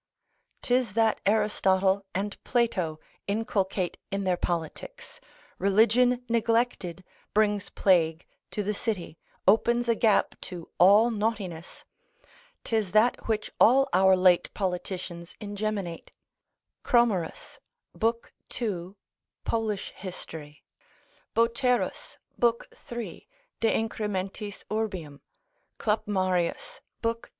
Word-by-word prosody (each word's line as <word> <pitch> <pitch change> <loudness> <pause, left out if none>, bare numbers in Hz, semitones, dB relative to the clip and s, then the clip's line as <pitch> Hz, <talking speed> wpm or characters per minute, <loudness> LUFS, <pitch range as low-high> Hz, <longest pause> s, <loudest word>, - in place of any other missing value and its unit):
'Tis 245 -4 +1
that 225 0 +2
Aristotle 200 -2 +2
and 200 +2 -3
Plato 185 -10 0 0.3
inculcate 200 -3 -1
in 195 0 -2
their 185 -1 +2
politics, 175 - -5 0.4
Religion 235 +5 +3
neglected, 230 -6 0 0.3
brings 210 -2 +2
plague 165 -3 +2 0.2
to 210 - -3
the 210 +2 -1
city, 195 -6 -4 0.3
opens 235 +4 +4
a 230 - +4
gap 225 -1 +3
to 175 -3 -7
all 205 +6 +7
naughtiness. 205 -6 -3 0.8
'Tis 215 -5 -1
that 220 +3 +3
which 220 -1 -1
all 270 +4 +6
our 190 0 +6
late 180 -1 +4
politicians 180 -2 -4
ingeminate. 205 -4 -4 0.7
Cromerus, 230 - +1 0.4
l. 225 +1 +4 0.4
2. 190 -5 -4 0.5
pol. 225 -1 0
hist. 190 -4 -6 1.0
Boterus, 240 +2 +1 0.2
l. 235 -1 +5 0.2
3. 235 -1 -8 0.3
de 225 - +3
incrementis 205 -2 -3
urbium. 185 -10 -3 0.6
Clapmarius, 195 - -1 0.2
l. 230 0 +2
2. 230 - -18
205 Hz, 95 wpm, -27 LUFS, 185-230 Hz, 1.0 s, all